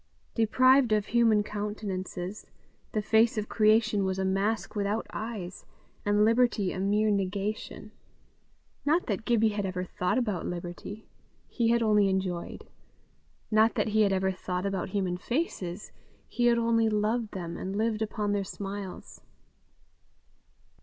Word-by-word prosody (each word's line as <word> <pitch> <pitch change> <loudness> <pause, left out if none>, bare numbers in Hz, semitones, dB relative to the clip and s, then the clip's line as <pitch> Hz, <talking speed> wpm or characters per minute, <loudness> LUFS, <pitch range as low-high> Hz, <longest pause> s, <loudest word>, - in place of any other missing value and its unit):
Deprived 255 +2 +4
of 210 -1 +2
human 225 -3 +3
countenances, 205 -2 -5 0.4
the 215 - -1
face 220 +1 +3
of 215 0 -1
creation 215 -1 +3
was 190 0 -1
a 190 - 0
mask 200 +4 -1
without 205 +2 -1
eyes, 205 -5 -5 0.4
and 205 +1 +3
liberty 230 -4 +2
a - - -5
mere 210 +2 +2
negation. 200 +2 -3 0.9
Not 320 +5 +2
that 210 0 -3
Gibbie 225 -2 +3
had 205 -1 -2
ever 185 -1 -2
thought 180 +3 -1
about 210 -9 -1
liberty; 175 +4 -7 0.4
he 235 -2 0
had 235 0 +3
only 210 -2 +4
enjoyed: 185 -2 -3 0.9
not 220 +1 +4
that - - 0
he 215 +1 +3
had 205 -2 +4
ever 190 0 +1
thought 180 0 -4
about 195 -2 -2
human 185 -2 -1
faces; 200 - -3 0.4
he 240 0 +1
had 235 0 +4
only 230 -1 +2
loved 215 +1 0
them, 170 -3 -5
and 190 +1 -4
lived 220 0 0
upon 210 -1 -1
their 205 -1 0
smiles. 195 -1 -7
210 Hz, 140 wpm, -28 LUFS, 190-225 Hz, 0.9 s, Deprived